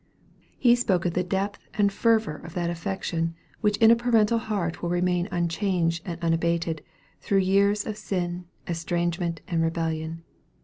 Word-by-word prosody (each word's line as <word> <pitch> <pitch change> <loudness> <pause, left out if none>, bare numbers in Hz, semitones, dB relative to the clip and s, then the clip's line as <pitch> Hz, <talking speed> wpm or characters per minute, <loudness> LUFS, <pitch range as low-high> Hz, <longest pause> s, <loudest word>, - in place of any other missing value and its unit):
He 240 -2 +5
spoke 190 -8 +1
of 175 - +1
the 180 - +1
depth 195 +3 -2 0.2
and 200 -1 +2
fervor 220 -8 +2
of 165 +2 -11
that 175 -1 0
affection 165 -2 -2 0.2
which 210 -1 +1
in 225 -1 +7
a - - +8
parental 230 -1 +3
heart 200 -7 -2
will 170 - -2
remain 175 0 +1
unchanged 170 -1 0
and 170 -1 -4
unabated, 165 -1 0 0.4
through 200 - +1
years 200 +2 +3
of 215 -1 -4
sin, 180 -3 -3 0.2
estrangement, 170 0 -1
and 170 -4 0
rebellion. 165 0 -2
175 Hz, 150 wpm, -26 LUFS, 165-200 Hz, 0.4 s, a